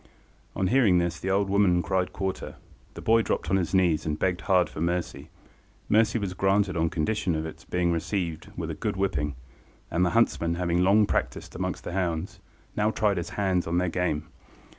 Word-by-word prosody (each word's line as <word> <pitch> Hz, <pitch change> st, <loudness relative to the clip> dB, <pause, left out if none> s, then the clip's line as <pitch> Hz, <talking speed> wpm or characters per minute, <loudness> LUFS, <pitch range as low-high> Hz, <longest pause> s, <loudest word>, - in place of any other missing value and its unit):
On 95 Hz, -, 0 dB
hearing 110 Hz, -4 st, +4 dB
this, 85 Hz, -1 st, 0 dB
the 95 Hz, -, -3 dB
old 100 Hz, +1 st, +2 dB
woman 95 Hz, -3 st, +3 dB
cried 95 Hz, -1 st, 0 dB
quarter. 95 Hz, -1 st, -4 dB, 0.4 s
The -, -, -8 dB
boy 115 Hz, +1 st, +4 dB
dropped 85 Hz, -6 st, -2 dB
on 95 Hz, -, +4 dB
his 95 Hz, +1 st, -1 dB
knees 85 Hz, -5 st, +3 dB
and 75 Hz, -1 st, -2 dB
begged 90 Hz, +1 st, 0 dB
hard 90 Hz, -3 st, +3 dB
for 75 Hz, -, -8 dB
mercy. 85 Hz, -4 st, -2 dB, 0.6 s
Mercy 110 Hz, +1 st, +3 dB
was 100 Hz, -4 st, -3 dB
granted 95 Hz, 0 st, +1 dB
on 80 Hz, 0 st, +1 dB
condition 85 Hz, +2 st, -1 dB
of 80 Hz, 0 st, -2 dB
its 80 Hz, +2 st, -9 dB
being 90 Hz, -1 st, 0 dB
received 85 Hz, -1 st, -3 dB
with -, -, -3 dB
a -, -, -3 dB
good -, -, -3 dB
whipping, 75 Hz, -7 st, -1 dB, 0.6 s
and 85 Hz, +2 st, +2 dB
the 90 Hz, -, +3 dB
huntsman, 85 Hz, -7 st, +2 dB
having 85 Hz, 0 st, 0 dB
long 100 Hz, +3 st, +5 dB
practised -, -, -2 dB
amongst -, -, -3 dB
the -, -, -5 dB
hounds, 90 Hz, -2 st, -2 dB, 0.4 s
now 105 Hz, 0 st, +2 dB
tried 105 Hz, -3 st, +1 dB
his 85 Hz, -, -3 dB
hand 95 Hz, -4 st, +1 dB
on 85 Hz, +1 st, 0 dB
their 90 Hz, 0 st, +1 dB
game. 80 Hz, -3 st, -1 dB
90 Hz, 195 wpm, -27 LUFS, 85-100 Hz, 0.6 s, long